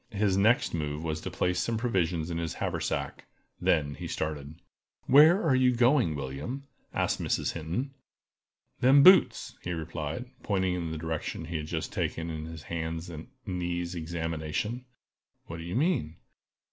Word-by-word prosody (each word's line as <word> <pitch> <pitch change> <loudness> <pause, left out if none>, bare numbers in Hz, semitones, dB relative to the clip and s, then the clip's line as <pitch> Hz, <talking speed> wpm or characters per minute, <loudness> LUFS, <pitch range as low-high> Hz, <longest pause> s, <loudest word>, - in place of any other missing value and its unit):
His 105 -3 +1
next 110 +5 +3
move 75 -1 -2
was 80 -1 -2
to - - -4
place 90 0 0
some 115 -1 0
provision 90 -8 0
in 85 - -2
his 85 -1 -3
haversack; - - -3 0.4
then 75 -2 +2
he - - -6
started. 75 -1 -4 0.5
"Where 155 +8 +7
are 160 -5 +3
you 130 -1 +4
going, 120 - +3
William?" 70 - -5 0.3
asked - - 0
Mrs. - - 0
Hinton. 85 - -3 0.9
"Them 135 +3 +6
boots!" 185 +2 +6
he 90 - -3
replied, 80 +4 -4 0.2
pointing 95 -3 0
in 85 -2 -3
the 80 - -4
direction 80 0 -4
he 85 0 -3
had 75 -1 -5
just 80 -1 -3
taken 85 0 -2
in 80 -1 -5
his 80 -1 -8
hands 80 +1 -4
and 80 -1 -8 0.2
knees 90 -2 -2
examination. 85 +7 -3 0.6
"What 85 - -7
do 85 - -7
you 85 +4 -5
mean?" 130 - +1
85 Hz, 160 wpm, -29 LUFS, 80-115 Hz, 0.9 s, Where